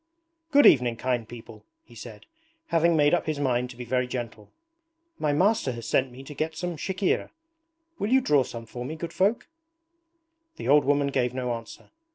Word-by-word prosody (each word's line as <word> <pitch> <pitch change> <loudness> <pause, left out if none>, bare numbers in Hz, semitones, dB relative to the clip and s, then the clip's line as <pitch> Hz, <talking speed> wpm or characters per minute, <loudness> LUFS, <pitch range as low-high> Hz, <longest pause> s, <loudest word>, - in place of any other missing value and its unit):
'Good 290 -2 +5
evening, 125 -3 +5
kind 120 -2 -2
people,' 120 -2 -11 0.2
he - - -19
said, - - -11 0.4
having 170 0 +3
made 145 0 +3
up 175 - +1
his 155 -2 -2
mind 125 -3 0
to 125 - -11
be 125 - -7
very 125 +1 0
gentle. 115 -4 -6 0.7
'My 150 - +1
master 180 - +2
has 115 -1 -7
sent 130 +1 +1
me 130 +2 -11
to 150 - -9
get 155 +2 -3
some 175 -1 -4
chikhir. 190 +4 -1 0.7
Will 205 - -1
you 265 - +6
draw 150 - +3
some 115 -2 -6
for 120 +2 -7
me, 150 +6 -5
good 170 +1 -6
folk?' 205 +5 +1 1.1
The - - -7
old 145 0 +5
woman 140 0 +2
gave 125 -2 -1
no 125 -2 -2
answer. 115 -1 -10
135 Hz, 190 wpm, -26 LUFS, 125-165 Hz, 1.1 s, you